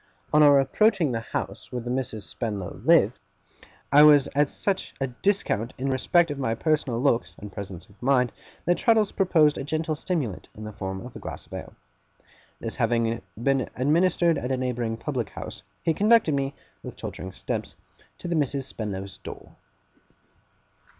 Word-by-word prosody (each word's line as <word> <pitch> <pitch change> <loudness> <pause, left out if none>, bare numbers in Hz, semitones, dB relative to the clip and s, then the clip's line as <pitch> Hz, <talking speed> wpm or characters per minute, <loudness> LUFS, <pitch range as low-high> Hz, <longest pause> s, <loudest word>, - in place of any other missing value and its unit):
On 150 - +6
our 145 -2 +7
approaching 175 - +3
the 115 - -1
house 115 - -5
where 125 -1 -4
the 120 - -3
Misses 125 -5 -3
Spenlow 105 -6 -5
lived, - - +4 0.7
I 145 +1 +8
was 150 -2 +7
at 145 0 +3
such 195 -2 -2
a 135 - +1
discount 125 - 0
in 135 +1 -1
respect 165 +5 +3
of 145 - -5
my 115 -4 0
personal 140 -3 0
looks 125 -3 +1
and 105 0 -9
presence 95 -3 -7
of 100 - -23
mind, 125 -1 +3 0.3
that 175 +1 +2
Traddles 225 -5 +3
proposed 160 -6 +3
a - - -3
gentle 155 +2 -1
stimulant 145 - -3
in 110 - -9
the 105 0 -7
form 95 +2 -5
of 125 - -11
a - - -7
glass - - -7
of - - -15
ale. - - -7 0.8
This - - -4
having 115 -2 +1 0.2
been 135 +1 +1
administered 165 +3 +3
at 125 - -3
a 130 - +1
neighbouring 120 -3 -2
public 125 -3 -3
house, - - -8 0.2
he 165 - +2
conducted 210 -2 +4
me, 140 0 -1 0.3
with - - -8
tottering 95 - -7
steps, 95 - -4 0.4
to - - -7
the 170 - 0
Misses 140 -3 0
Spenlow's 100 -6 -5
door. - - -10
135 Hz, 170 wpm, -26 LUFS, 115-155 Hz, 0.8 s, I